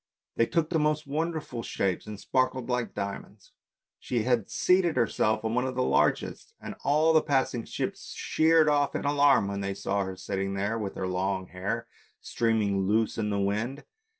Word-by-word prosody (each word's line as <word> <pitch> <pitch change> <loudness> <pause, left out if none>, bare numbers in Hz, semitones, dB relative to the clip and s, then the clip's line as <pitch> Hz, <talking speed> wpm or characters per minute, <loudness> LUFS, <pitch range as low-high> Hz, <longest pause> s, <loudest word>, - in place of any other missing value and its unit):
They 115 - +2
took 165 -1 0
the 165 - +2
most 150 0 +1
wonderful 155 -4 -3
shapes, 95 -4 -2
and 105 -2 -7
sparkled 130 0 0
like 125 -1 -2
diamonds. 100 +1 -6 0.5
She 120 -3 -1
had 120 -4 +1
seated 180 -2 +2
herself 110 -2 +1
on 110 - 0
one 125 +2 +1
of 130 - -4
the 130 - +1
largest, - - 0
and - - -7
all 155 +3 +3
the 160 - +6
passing 130 -5 0
ships - - -5
sheered 160 0 +3
off 145 -1 +2
in - - -2
alarm 145 -7 +4
when 100 0 -3
they 100 0 -3
saw 100 0 -1
her 95 0 -5
sitting 95 +1 -3
there 105 +4 -1
with 100 -3 -4
her - - -3
long 95 0 -2
hair 100 +6 -3 0.3
streaming 105 -4 0
loose 110 +2 +1
in 105 -1 0
the 100 - -1
wind. 110 +8 -1
115 Hz, 180 wpm, -28 LUFS, 100-145 Hz, 0.5 s, the